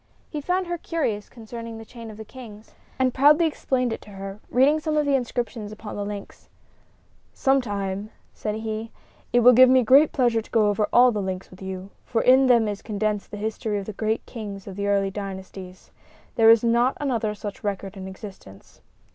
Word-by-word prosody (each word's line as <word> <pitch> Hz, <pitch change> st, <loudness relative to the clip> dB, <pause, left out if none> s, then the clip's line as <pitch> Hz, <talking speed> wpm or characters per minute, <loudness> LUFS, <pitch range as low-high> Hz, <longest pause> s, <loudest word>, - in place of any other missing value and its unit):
He 300 Hz, -, -4 dB
found 365 Hz, +5 st, 0 dB
her 345 Hz, -1 st, -4 dB
curious 235 Hz, -13 st, -2 dB
concerning 230 Hz, -1 st, -8 dB
the 225 Hz, -, -10 dB
chain 230 Hz, 0 st, -10 dB
of 215 Hz, -, -10 dB
the 220 Hz, -, -8 dB
kings, 220 Hz, -3 st, -12 dB, 0.2 s
and 260 Hz, -1 st, +1 dB
proudly 295 Hz, +5 st, +5 dB
explained 255 Hz, -5 st, 0 dB
it -, -, -6 dB
to -, -, -15 dB
her, 195 Hz, 0 st, -8 dB
reading 280 Hz, +5 st, +4 dB
some 310 Hz, 0 st, -1 dB
of 300 Hz, -, +2 dB
the 285 Hz, -, +1 dB
inscriptions 235 Hz, -4 st, -2 dB
upon 215 Hz, 0 st, -8 dB
the 205 Hz, -, -3 dB
links. 205 Hz, -1 st, -8 dB, 0.8 s
"Some 270 Hz, -1 st, +2 dB
time," 200 Hz, -2 st, -4 dB, 0.2 s
said 210 Hz, -1 st, -3 dB
he, 220 Hz, +1 st, -4 dB, 0.4 s
"it 240 Hz, -, +4 dB
will 250 Hz, +2 st, +8 dB
give 255 Hz, +1 st, +8 dB
me 260 Hz, -1 st, +5 dB, 0.2 s
pleasure 240 Hz, -5 st, +1 dB
to -, -, -17 dB
go 215 Hz, -2 st, +3 dB
over 205 Hz, +1 st, +1 dB
all 245 Hz, +1 st, +6 dB
the 210 Hz, -3 st, -2 dB
links 190 Hz, -1 st, -5 dB
with 185 Hz, -, -15 dB
you, 190 Hz, 0 st, -6 dB
for 225 Hz, -, -1 dB
in 260 Hz, +1 st, +6 dB
them 235 Hz, -3 st, +4 dB
is 205 Hz, -1 st, -4 dB
condensed 210 Hz, -1 st, -2 dB
the 205 Hz, -, -7 dB
history 215 Hz, 0 st, -2 dB
of 200 Hz, -, -4 dB
the 215 Hz, -, -6 dB
great 220 Hz, +2 st, -2 dB
kings 205 Hz, -5 st, -7 dB
of 195 Hz, -, -8 dB
the 200 Hz, 0 st, -2 dB
early 200 Hz, -1 st, +1 dB
dynasties. 190 Hz, -2 st, -8 dB, 0.4 s
There 225 Hz, -1 st, +5 dB
is 230 Hz, 0 st, +6 dB
not 235 Hz, +2 st, +2 dB
another 230 Hz, -7 st, -1 dB
such 205 Hz, -1 st, -7 dB
record 200 Hz, -1 st, -3 dB
in 190 Hz, -1 st, -7 dB
existence." 190 Hz, -, -12 dB
220 Hz, 200 wpm, -24 LUFS, 200-250 Hz, 0.8 s, will